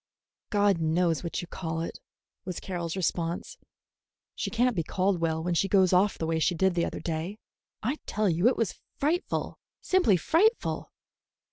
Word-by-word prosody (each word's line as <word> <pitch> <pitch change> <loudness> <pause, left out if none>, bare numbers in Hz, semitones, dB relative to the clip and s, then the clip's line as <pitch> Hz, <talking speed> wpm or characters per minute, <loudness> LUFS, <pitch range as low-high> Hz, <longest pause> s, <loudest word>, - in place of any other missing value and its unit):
"God 205 -4 +3
knows 165 +1 +1
what 170 - -3
you 175 - -8
call 165 -2 -4
it," 165 - -5 0.4
was 180 -2 -5
Carroll's 175 -3 -4
response. 175 - -2 0.7
"She - - -3
can't 245 +1 +2
be 170 - +1
called 185 +3 0
well 160 -1 0
when 175 +1 0
she 185 +3 +2
goes 190 -2 +4
off 195 +3 +3
the 160 - -2
way 160 0 0
she 175 +2 +2
did 190 +2 +2
the 170 -1 +1
other - - -4
day. 165 +5 -3 0.5
I 260 +8 -1
tell 215 0 0
you 175 +4 +3
it 250 - +3
was 225 -6 -1 0.2
frightful, 320 +6 -1 0.2
simply 360 - +3
frightful!" 385 - +1
180 Hz, 170 wpm, -28 LUFS, 165-210 Hz, 0.7 s, goes